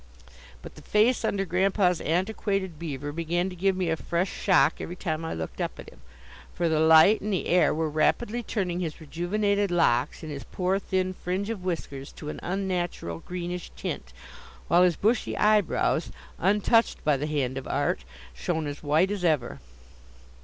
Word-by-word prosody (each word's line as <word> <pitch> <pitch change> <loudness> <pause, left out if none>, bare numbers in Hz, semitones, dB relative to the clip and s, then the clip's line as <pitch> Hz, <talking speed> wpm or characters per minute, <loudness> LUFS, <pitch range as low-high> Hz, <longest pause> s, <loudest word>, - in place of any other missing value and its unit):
But - - -9
the - - -13
face 220 +4 +2
under 195 -1 0
Grandpa's 185 -1 +2
antiquated 190 0 -1
beaver 145 -3 -4
began 170 +4 -1
to - - -8
give 190 +2 +1
me 180 -3 0
a - - +2
fresh 170 +3 -1
shock 175 -5 +3
every 175 - -5
time 160 -3 -3
I 160 - -3
looked 80 -1 -5
up - - -3
at - - -10
him, - - -19 0.5
for 175 - +1
the 160 -1 +2
light 160 +6 +6
and 210 - -3
the 190 - -1
air 180 +1 +4
were 160 +1 0
rapidly 215 +10 +1
turning 185 -6 -2
his 165 -4 -4
rejuvenated 200 +6 0
locks 150 -5 +1
and 155 - -6
his 140 -2 -6
poor, 185 +1 -1
thin 185 -1 -1
fringe 185 +4 -3
of 200 -5 -5
whiskers 140 -6 -4
to 150 - -8
an - - -6
unnatural 180 - -3
greenish 180 - -5
tint, - - -5 0.6
while 175 - +5
his 180 -2 +4
bushy 220 +3 0
eyebrows, 210 -3 +2 0.3
untouched 210 +5 +2
by 150 -1 +3
the 145 +3 -2
hand 140 -4 -1
of 135 - -5
art, 60 - 0 0.3
shone 150 - -2
as 145 0 -5
white 155 +6 +2
as 205 -3 -3
ever. 150 -8 +1
175 Hz, 175 wpm, -27 LUFS, 155-195 Hz, 0.6 s, light